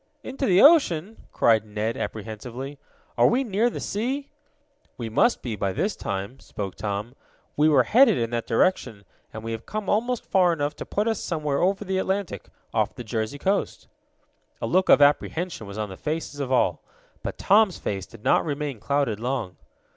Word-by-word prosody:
"Into 270 +1 -3
the 185 0 +5
ocean!" 225 - +4
cried 110 -2 +3
Ned 110 +1 -3
apprehensively. 115 +6 -6 0.4
"Are - - +7
we 255 +3 +2
near 225 0 +1
the - - -6
sea?" 265 +7 -3 0.7
"We 115 -2 -4
must 175 - +2
be, 115 -4 -3
by 100 -2 -2
this 205 - -1
time," 100 +7 -5
spoke 100 -3 -6
Tom. 105 +3 -4 0.4
"We 150 +1 +4
were 140 -4 +5
headed 255 - +5
in 115 -1 -1
that 120 -1 -2
direction, 115 - +1 0.3
and 110 - -8
we 115 - -4
have 115 0 -6
come 215 -2 -3
almost 240 +3 0
far 180 -2 +3
enough 145 -2 -2
to - - -7
put 210 +2 -1
us 225 - 0
somewhere 150 -4 -2
over 195 +3 +1
the 190 0 -1
Atlantic, 190 - -2 0.3
off - - 0
the 125 - -7
Jersey 110 +3 -3
coast." 195 +7 -1 0.7
A - - -3
look 185 0 +2
of 145 - +7
apprehension 150 - +1
was 100 +1 -8
on 105 -1 -3
the 95 - -9
faces 155 -1 -4
of 135 -2 -3
all. 130 - +2 0.4
But - - -5
Tom's 205 -1 +4
face 95 -2 -4
did 115 -2 -15
not - - +3
remain 145 -5 -3
clouded 125 -2 0
long. 120 -6 -3
145 Hz, 185 wpm, -25 LUFS, -, 0.7 s, Are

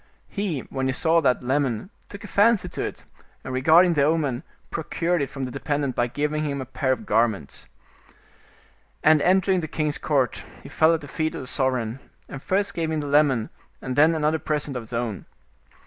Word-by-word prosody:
He, 195 -9 -2
when 135 -1 -3
he 130 - 0
saw 165 +4 +3
that 125 -4 +1
lemon, 135 - -1 0.2
took 200 - -10
a - - -7
fancy 220 +1 +3
to - - -5
it, - - -5 0.4
and 130 - -6
regarding 160 +7 +5
the 150 - +2
omen, 145 -5 +1 0.3
procured 170 +1 -1
it 140 - -2
from 135 -2 -5
the 125 - -6
dependent 145 -1 -2
by 120 - +1
giving 150 +4 -2
him 140 -2 -2
a 130 - -4
pair 130 +1 -1
of 130 - -2
garments. 110 -9 0 1.4
And 155 -1 +5
entering 190 +1 +3
the 160 - -4
king's 150 -1 -2
court, 135 -5 0 0.2
he - - -10
fell 160 +1 +4
at 160 - -5
the 145 - -9
feet 155 +3 -2
of - - -5
the - - -7
sovereign, 125 -2 -1 0.3
and 135 - -8
first 200 +5 0
gave 165 -2 -2
him 155 -1 -1
the - - -5
lemon, 140 -6 +2 0.3
and 130 -1 -4
then 155 +4 +5
another 155 0 +1
present 150 -2 -2
of 125 - -3
his 115 - -14
own. 115 -4 -3
145 Hz, 200 wpm, -24 LUFS, 130-160 Hz, 1.4 s, regarding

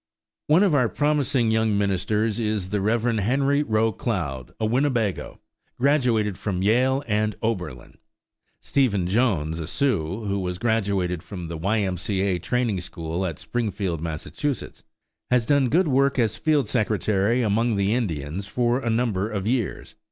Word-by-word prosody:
One 160 +6 +5
of 195 -6 +3
our 125 -5 +3
promising 145 -6 +1
young 110 -2 +2
ministers 105 +3 0
is 105 -4 -1
the 105 -1 0
Rev. 110 +3 +1 0.2
Henry 135 +7 +2
Roe 110 -4 +1
Cloud, 80 - -3
a 110 - 0
Winnebago, 120 -4 0 0.4
graduated 120 -8 +2
from 95 -3 -2
Yale 130 +6 +2
and 105 -1 0
Oberlin. 90 - -4 0.6
Stephen 110 -10 +1
Jones, 90 -7 +1
a 80 - -5
Sioux, 105 - -1
who 100 0 -1
was 90 -1 -3
graduated 100 -6 0
from 90 -2 -7
the 85 - -4
Y. 105 +6 +1
M. 95 -2 -1
C. 95 +2 -2
A. 95 -3 +1
training 110 0 -1
school 85 +1 -4
at 80 -4 -5
Springfield, 100 -8 -3
Mass., 80 -1 -4 1.1
has 125 -2 +3
done 140 -1 +3
good 175 +5 +3
work 140 0 +2
as 110 -4 +1
field 145 +5 +1
secretary 110 +1 +1
among 115 +2 +1
the 100 +1 +1
Indians 90 - -2
for 120 +3 +1
a 120 - -2
number 110 -3 0
of 100 -3 -3
years. 115 -1 -2
110 Hz, 155 wpm, -24 LUFS, 95-125 Hz, 1.1 s, One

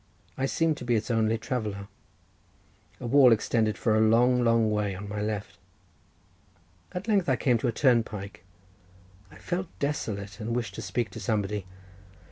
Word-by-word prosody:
I 135 - -1
seemed 160 +1 +1
to - - -8
be 120 -1 +1
its 110 +2 -1
only 115 0 +2
traveller—a 105 -4 -4 1.2
wall 130 +1 +6
extended 110 -1 +1
for 110 -3 +1
a 110 - +3
long, 120 +3 +4
long 115 -2 +3
way 105 -2 -1
on 100 +2 -7
my 105 +1 -4
left. 105 -1 -4 1.3
At 180 +4 -6
length 200 -7 +2
I 130 - +4
came 125 -2 +2
to 125 - -1
a - - +2
turnpike. 110 -5 0 0.9
I 80 - -16
felt 180 - -3
desolate, 105 -8 -3
and 115 +1 -3
wished 120 -2 -2
to - - -6
speak 115 -4 -2
to - - -8
somebody. 105 -4 -2
115 Hz, 160 wpm, -27 LUFS, 105-125 Hz, 1.3 s, wall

